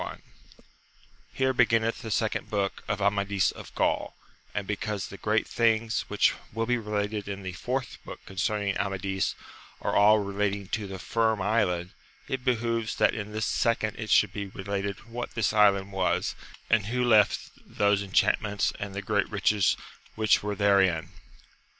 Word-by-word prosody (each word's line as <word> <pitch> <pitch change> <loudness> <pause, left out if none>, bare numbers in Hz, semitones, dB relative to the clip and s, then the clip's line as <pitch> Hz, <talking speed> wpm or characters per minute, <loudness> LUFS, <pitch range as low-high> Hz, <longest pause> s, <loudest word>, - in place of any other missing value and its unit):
I.— - - -5 1.1
Here 130 0 +1
beginneth 115 -2 +2
the 110 - -6
Second 105 - -1
Book 100 -2 -2
of 105 -1 -1
Amadis 100 -1 +2
of - - -11
Gaol; - - 0 0.4
and 105 - -3
because 105 -1 -3
the - - -9
great - - +1
things 115 -1 +1
which - - +3 0.2
will 115 +1 -1
be 125 +1 +1
related 105 -1 -2
in 100 -1 -5
the 95 -1 -5
Fourth 125 +8 -3
Book - - -9
concerning 100 +1 -1
Amadis 95 -1 -1 0.4
are - - -2
all 105 +1 +6
relating 100 -1 -1
to 105 -2 -2
the 95 0 -6
Finn 110 +4 0
Island, 95 -4 0 0.4
it 130 -1 -3
behoves 115 -3 0
that 105 - +3
in 105 -1 -5
this 110 0 -2
second 110 -2 0
it 110 -1 -5
should - - +4
be 100 -1 -4
related 100 +1 -4
what 120 +1 -6
this 110 -2 +1
island 100 -2 +4
was, 95 -1 0 0.3
and 105 -3 +2
who 125 +2 0
left 110 -4 +3
those 100 -1 +1
enchantments 100 +1 +1
and 100 -1 -5
the 100 - -4
great 100 0 0
riches 100 -1 +2 0.4
which 110 -1 +3
were 105 0 -3
therein. 95 -5 +3
105 Hz, 160 wpm, -27 LUFS, 100-110 Hz, 1.1 s, all